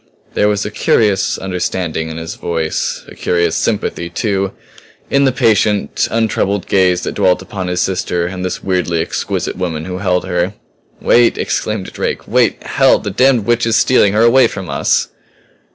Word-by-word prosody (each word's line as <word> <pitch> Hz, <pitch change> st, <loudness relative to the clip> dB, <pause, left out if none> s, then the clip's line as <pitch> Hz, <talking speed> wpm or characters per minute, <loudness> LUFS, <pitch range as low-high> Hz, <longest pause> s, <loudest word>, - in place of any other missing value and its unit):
There 105 Hz, -, +2 dB
was 105 Hz, 0 st, 0 dB
a 105 Hz, -, -4 dB
curious 105 Hz, -2 st, +1 dB
understanding 90 Hz, -3 st, -3 dB
in 80 Hz, -, -6 dB
his 80 Hz, 0 st, -5 dB
voice 80 Hz, -2 st, -2 dB
a -, -, -11 dB
curious 85 Hz, -1 st, 0 dB
sympathy, 85 Hz, -, -1 dB
too, 100 Hz, -3 st, -1 dB, 0.6 s
in 140 Hz, 0 st, +3 dB
the 135 Hz, -, +3 dB
patient, 110 Hz, -5 st, +1 dB
untroubled 105 Hz, -3 st, 0 dB
gaze 90 Hz, -2 st, +2 dB
that -, -, -4 dB
dwelt 90 Hz, 0 st, +2 dB
upon 95 Hz, -1 st, -5 dB
his 90 Hz, 0 st, -1 dB
sister 90 Hz, -2 st, -1 dB
and 90 Hz, +1 st, -5 dB
this 90 Hz, -, -4 dB
weirdly 90 Hz, -3 st, 0 dB
exquisite 80 Hz, -, -3 dB
woman 80 Hz, -4 st, -3 dB
who 90 Hz, 0 st, -5 dB
held 90 Hz, -2 st, 0 dB
her. 90 Hz, +1 st, -1 dB, 0.5 s
"Wait!" 120 Hz, -1 st, +3 dB
exclaimed -, -, -2 dB
Drake. -, -, -3 dB
"Wait -, -, +1 dB
hell! -, -, +3 dB
The 100 Hz, -, -5 dB
damned 125 Hz, 0 st, +3 dB
witch 120 Hz, 0 st, +1 dB
is 115 Hz, -, +2 dB
stealing 105 Hz, -6 st, +4 dB
her 110 Hz, +2 st, +3 dB
away 120 Hz, +1 st, +5 dB
from 95 Hz, -5 st, -7 dB
us!" -, -, +1 dB
95 Hz, 170 wpm, -16 LUFS, 90-105 Hz, 0.6 s, away